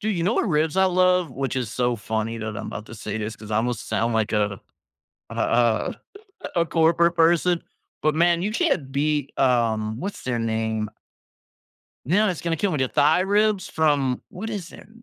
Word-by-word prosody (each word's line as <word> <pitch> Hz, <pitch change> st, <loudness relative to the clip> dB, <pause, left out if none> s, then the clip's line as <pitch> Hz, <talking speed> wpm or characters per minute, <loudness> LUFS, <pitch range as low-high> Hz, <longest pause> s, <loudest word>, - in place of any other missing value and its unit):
Dude, 215 Hz, -3 st, -1 dB
you 170 Hz, -, -1 dB
know 200 Hz, +7 st, +1 dB
what -, -, +1 dB
ribs 155 Hz, 0 st, +1 dB
I 190 Hz, -, +5 dB
love? 180 Hz, -3 st, +3 dB
Which 135 Hz, 0 st, -3 dB
is 120 Hz, -5 st, -2 dB
so 120 Hz, -1 st, 0 dB
funny 110 Hz, +2 st, -3 dB
that 110 Hz, -1 st, -5 dB
I'm -, -, -5 dB
'bout 110 Hz, -, -7 dB
to 110 Hz, -, -10 dB
say 105 Hz, 0 st, -5 dB
this, 110 Hz, +1 st, -4 dB
'cause 110 Hz, -1 st, -12 dB
I 105 Hz, -, +1 dB
almost 120 Hz, 0 st, -1 dB
sound 115 Hz, +1 st, 0 dB
like 110 Hz, 0 st, 0 dB
a 105 Hz, -2 st, 0 dB, 0.7 s
a -, -, -8 dB
a 115 Hz, -2 st, +1 dB, 0.6 s
a 170 Hz, -, +3 dB
corporate 170 Hz, +1 st, +3 dB
person, 170 Hz, +1 st, +3 dB, 0.4 s
but, 155 Hz, -, +3 dB
man, 170 Hz, +1 st, +3 dB
you 210 Hz, -, -1 dB
can't 225 Hz, -, 0 dB
beat, 145 Hz, 0 st, -1 dB
um, 115 Hz, -3 st, +1 dB
what's 200 Hz, +5 st, -5 dB
their 125 Hz, -2 st, -1 dB
name? 110 Hz, -1 st, -1 dB, 1.2 s
You 160 Hz, -, 0 dB
know, 210 Hz, +2 st, +4 dB
it's 180 Hz, -4 st, -2 dB
gonna 165 Hz, -1 st, -1 dB
kill 195 Hz, +4 st, 0 dB
with 150 Hz, -, -1 dB
their 130 Hz, -1 st, +1 dB
Thai 155 Hz, +7 st, +3 dB
ribs 205 Hz, +1 st, +2 dB
from 145 Hz, -5 st, +1 dB
What 220 Hz, +5 st, -6 dB
is 195 Hz, -5 st, -5 dB
their -, -, -13 dB
name? 230 Hz, +2 st, -20 dB
145 Hz, 205 wpm, -24 LUFS, 115-175 Hz, 1.2 s, I